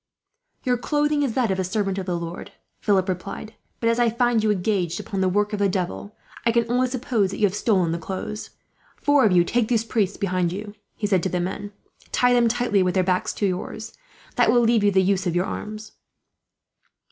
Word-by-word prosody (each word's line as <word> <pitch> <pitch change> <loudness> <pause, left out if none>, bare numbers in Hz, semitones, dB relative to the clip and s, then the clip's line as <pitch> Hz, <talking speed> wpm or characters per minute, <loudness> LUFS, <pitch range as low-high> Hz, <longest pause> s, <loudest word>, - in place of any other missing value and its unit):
"Your 250 -2 +1
clothing 295 +2 +1
is 265 -6 -1
that 240 -6 +1
of 190 - -1
a - - +1
servant 195 +1 -1
of 190 - -6
the 175 -1 -1
Lord," 170 +1 -7 0.3
Philip 195 -3 +2
replied; 195 +4 -5 0.3
"but 230 - 0
as 230 +1 +2
I 240 -1 +4
find 235 0 +2
you 215 - +2
engaged 185 -3 0
upon 195 -1 -4
the 190 - +2
work 205 +3 0
of 210 - -2
the 200 -1 +3
devil, 190 +2 -3 0.3
I 230 - +3
can 235 0 +2
only 255 +1 +2
suppose 245 -5 0
that 195 - -6
you 215 - +3
have 190 - 0
stolen 195 -5 +1
the 170 - -2
clothes. 190 +5 -5 0.5
"Four 290 -3 +3
of 210 - +4
you 175 -1 +5
take 230 +5 0
these 230 -2 +1
priests 210 -5 0
behind 185 -3 0
you," 205 +2 -6 0.2
he 210 - -3
said 195 -3 +2
to 190 - -1
his 180 - -1
men; 195 +3 -4 0.4
"tie 245 0 +3
them 240 -1 +4
tightly, 230 -3 +1
with 180 -1 +1
their 185 - +3
backs 180 0 0
to 205 - -1
yours. 200 +4 -4 0.4
That - - +5
will 240 - +4
leave 230 -2 +3
you 205 - +5
the 190 -1 +3
use 190 -1 +1
of 175 - -1
your 175 +1 +2
arms. 215 0 -6
205 Hz, 225 wpm, -23 LUFS, 185-230 Hz, 0.5 s, you